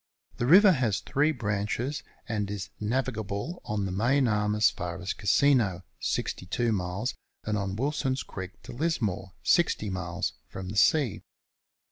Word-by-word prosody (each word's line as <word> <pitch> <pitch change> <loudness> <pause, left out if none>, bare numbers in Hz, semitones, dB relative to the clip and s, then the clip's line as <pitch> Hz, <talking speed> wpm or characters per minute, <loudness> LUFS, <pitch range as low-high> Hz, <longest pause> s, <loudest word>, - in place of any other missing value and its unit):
The 120 - 0
river 190 +6 +8
has 120 - +1
three 150 +3 +1
branches, 110 +4 -2 0.3
and 105 -3 -2
is 100 -1 -5
navigable 110 - -2
on 105 -2 -1
the 95 - -3
main 125 +7 +2
arm 105 -1 +1
as 105 0 +4
far 85 0 -5
as 90 +1 -2
Casino, 100 -3 +3 0.2
62 115 +6 -1
miles, 95 +4 -1 0.3
and 105 - -1
on 100 -2 -2
Wilson's 135 +1 -1
Creek 95 -1 -8
to - - -9
Lismore, 110 - -1
60 155 - +2
miles, 90 -3 -2 0.2
from 95 -1 -6
the 100 - -5
sea. 125 - +3
105 Hz, 145 wpm, -28 LUFS, 95-130 Hz, 0.3 s, river